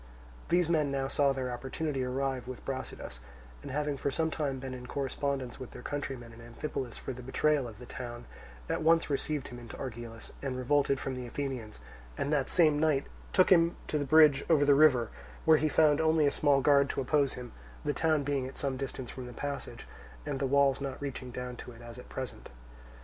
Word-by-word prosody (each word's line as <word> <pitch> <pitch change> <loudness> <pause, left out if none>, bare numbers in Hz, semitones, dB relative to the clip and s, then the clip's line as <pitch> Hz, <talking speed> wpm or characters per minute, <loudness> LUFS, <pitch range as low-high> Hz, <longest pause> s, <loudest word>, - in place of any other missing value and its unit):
These 175 -1 +3
men 155 -4 +2
now 135 -1 -1
saw 140 0 +3
their 130 -2 -2
opportunity 135 +2 -3
arrive 130 0 -2
with 130 -1 -8
Brasidas, 130 - -5 0.4
and - - -8
having 145 +1 -1
for 140 - -1
some 160 +3 0
time 140 -4 -1
been 130 0 -6
in 125 -1 -8
correspondence 135 -1 -2
with 130 - -7
their 125 - -11
countrymen 130 -5 -4
in 115 - -13
Amphipolis 120 +1 -5
for 130 - -5
the 125 - -9
betrayal 140 +2 +1
of 110 -3 -10
the 125 - -10
town, 120 -2 -7 0.4
at - - -1
once 165 -1 +3
received 145 0 -1
him 120 - -8
into 120 -1 -9
Argilus, 115 -3 -7
and 135 -2 -3
revolted 140 +1 +2
from 135 - -3
the 125 -1 -5
Athenians, 125 - -4 0.4
and 145 - 0
that 140 -3 +1
same 155 -4 +4
night 150 -3 +2 0.3
took 185 -1 +4
him 170 -3 +8
on - - -16
to 150 - +1
the - - 0
bridge 150 -1 +6
over 150 -3 +5
the 145 - +6
river; 140 -6 +5 0.4
where 160 -1 +7
he 155 - +2
found 150 0 +4
only 160 -1 +4
a 140 - +4
small 140 -2 +3
guard 140 0 +5
to - - -2
oppose 140 0 +2
him, 125 -2 -8 0.3
the 145 - +1
town 155 -2 +2
being 140 -2 -1
at 130 - -10
some 135 -2 -2
distance 130 -2 -5
from 130 -1 -7
the 125 - -9
passage, 140 +3 -5 0.4
and 135 - -2
the 135 - +1
walls 140 0 +3
not 135 -1 -4
reaching 135 -2 -5
down 125 0 -5
to 125 - -9
it 115 - -14
as 120 +1 -9
at - - -12
present. 130 -2 -6
135 Hz, 215 wpm, -31 LUFS, 125-145 Hz, 0.4 s, him